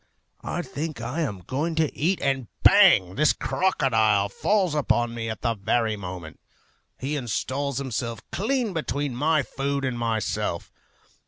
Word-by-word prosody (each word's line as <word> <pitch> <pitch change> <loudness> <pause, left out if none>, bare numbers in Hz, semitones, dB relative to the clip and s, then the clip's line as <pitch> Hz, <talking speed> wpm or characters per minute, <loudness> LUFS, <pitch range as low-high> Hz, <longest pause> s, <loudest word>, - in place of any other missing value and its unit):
I - - -3
think 155 -2 -5
I 125 +8 -3
am 105 - -3
going 145 - -2
to 160 -2 0
eat, 175 +5 +1
and 135 -3 0 0.2
bang! 180 - +6
this 150 +7 +3
crocodile 110 - +2
falls 190 - +1
upon 120 -5 +1
me 115 -1 -4
at 110 - -5
the 115 -2 +2
very 110 +1 0
moment. 90 -5 -8 0.6
He 140 +3 -3
installs 135 +1 -2
himself 120 -4 -3
clean 230 +1 0
between 145 -4 -2
my 150 +3 +2
food 140 +1 -2
and 125 -2 -2
myself. 115 -2 -2
135 Hz, 145 wpm, -25 LUFS, 115-155 Hz, 0.6 s, bang